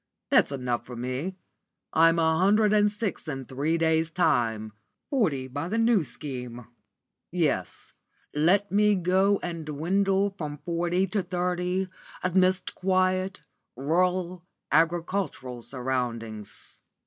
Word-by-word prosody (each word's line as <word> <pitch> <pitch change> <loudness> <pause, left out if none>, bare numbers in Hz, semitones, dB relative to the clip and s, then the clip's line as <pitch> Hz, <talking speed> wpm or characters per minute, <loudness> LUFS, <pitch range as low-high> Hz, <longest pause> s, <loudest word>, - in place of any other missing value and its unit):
That's - - +5
good 140 -2 -5
enough 120 -2 -1
for 125 +1 -9
me. 130 +10 -3 0.6
I'm 165 +1 +5
a 160 -1 +2
hundred 210 +3 +4
and 210 -1 +4
six 210 -5 -3
in 135 -3 -4
three 145 +6 -1
days' 160 0 +2
time; 120 - +1 0.4
forty 160 - +1
by 145 +5 -4
the 215 +5 -1
New 230 -5 +4
Scheme. 125 -5 -6 0.6
Yes, - - -1 0.4
let 185 +7 +2
me 210 +1 +4
go 190 +2 +2
and 170 -2 -4
dwindle 195 +6 +1
from 150 -6 -6
forty 175 +3 0
to 195 +2 -1
thirty 180 +1 -1 0.4
amidst 185 +1 +2
quiet, 185 -2 0 0.3
rural, 180 +5 0 0.3
agricultural 165 -5 0
surroundings." 120 -4 -4
170 Hz, 120 wpm, -27 LUFS, 140-190 Hz, 0.6 s, That's